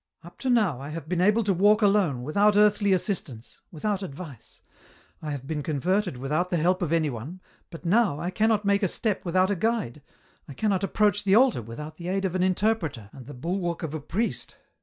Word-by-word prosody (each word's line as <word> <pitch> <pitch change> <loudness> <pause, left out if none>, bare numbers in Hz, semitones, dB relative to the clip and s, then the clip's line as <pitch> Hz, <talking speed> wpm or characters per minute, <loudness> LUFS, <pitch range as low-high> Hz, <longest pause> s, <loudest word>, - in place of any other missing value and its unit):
" - - -44
Up 175 +1 -14
to 265 - -2
now 210 - +2
I 140 - -7
have 155 -1 -7
been 180 +1 -1
able 210 +4 +3
to 200 -1 +1
walk 205 +4 +4
alone, 195 -11 +2
without 205 +9 +3
earthly 205 -1 +4
assistance, 170 - -3
without 195 +5 -2
advice; 150 - -10 0.6
I 155 - -5
have 140 -3 -5
been 150 +1 -3
converted 175 +3 -1
without 150 +8 -1
the 175 - 0
help 180 +4 +1
of 170 -3 -1
anyone, 155 0 -2 0.3
but 165 +1 -11
now 190 -4 +2
I 175 +3 -3
cannot 215 +1 +1
make 200 +1 +2
a 195 - +2
step 210 +3 -1
without 185 +2 +2
a - - +1
guide, 205 - -1 0.5
I 140 - -10
cannot 200 +2 0
approach 205 +1 +1
the 195 -1 +3
altar 250 - +4
without 150 +8 -9
the 170 - -7
aid 195 +1 -1
of 185 - -1
an 185 - 0
interpreter, 180 - 0
and 130 -3 -12
the 145 - -9
bulwark 170 +5 -3
of 160 -2 -4
a 155 - -4
priest." 205 +11 -3
180 Hz, 210 wpm, -26 LUFS, 150-205 Hz, 0.6 s, walk